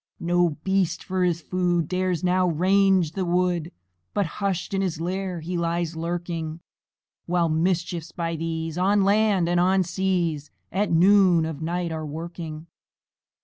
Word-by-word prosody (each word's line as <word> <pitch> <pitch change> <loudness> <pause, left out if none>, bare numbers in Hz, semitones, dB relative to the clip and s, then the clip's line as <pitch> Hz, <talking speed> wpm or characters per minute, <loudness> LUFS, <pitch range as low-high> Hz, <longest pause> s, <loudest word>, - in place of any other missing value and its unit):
No 175 -2 +1
beast, 190 -3 0
for 185 -1 -1
his 170 -2 +1
food, 175 -2 0
Dares 185 -2 -1
now 180 0 +2
range 185 0 +3
the 190 +2 -2
wood, 175 -2 0 0.4
But 205 - +2 0.2
hush'd 195 -1 -1
in 195 - +1
his 180 -4 -2
lair 180 0 -3
he 175 +2 -3
lies 170 0 -1
lurking; 165 -1 -4 0.7
While 170 -1 +1
mischiefs, 170 0 -1
by 165 -1 -3
these, 165 0 -3
On 200 +2 +3
land 200 -3 +3
and 175 0 +2
on 185 +1 +3
seas, 175 -5 -1 0.2
At 205 +3 0
noon 180 -1 +5
of 160 -2 -5
night 170 +1 -2
are 160 -1 -3
a - - -5
working. 160 0 -7
175 Hz, 150 wpm, -24 LUFS, 165-185 Hz, 0.7 s, noon